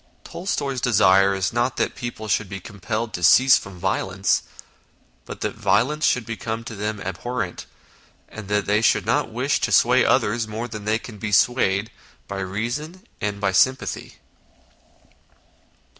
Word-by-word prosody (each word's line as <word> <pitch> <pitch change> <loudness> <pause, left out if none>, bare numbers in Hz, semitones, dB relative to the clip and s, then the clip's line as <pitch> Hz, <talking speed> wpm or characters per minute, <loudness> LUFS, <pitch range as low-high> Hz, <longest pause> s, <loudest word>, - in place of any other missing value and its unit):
Tolstoy's 140 -8 -3
desire 95 -4 +4
is 95 +2 -1
not 120 +2 0
that - - 0
people 120 -2 -6
should 100 -1 0
be 95 0 -6
compelled 110 +4 -5
to 90 - -4
cease 130 +10 +6
from 95 -2 -11
violence, 95 +1 0 0.8
but - - -9
that - - -2
violence 150 +8 +1
should 125 -3 +1
become 115 0 -4
to 115 - -8
them 105 +1 -3
abhorrent, 95 +1 -4 0.6
and 110 -2 -10
that 105 0 0
they 105 +2 +2
should - - +2
not - - +1
wish - - 0
to - - -1
sway - - +5
others 110 +2 +1
more 110 +3 -4
than 110 -3 -8
they 110 +1 +2
can 115 -2 -11
be 110 0 -4
swayed 105 -2 +2 0.4
by 100 - -5
reason 120 - -4 0.2
and 105 -1 -2
by 100 -1 +1
sympathy. 130 +7 0
110 Hz, 155 wpm, -23 LUFS, 100-120 Hz, 0.8 s, cease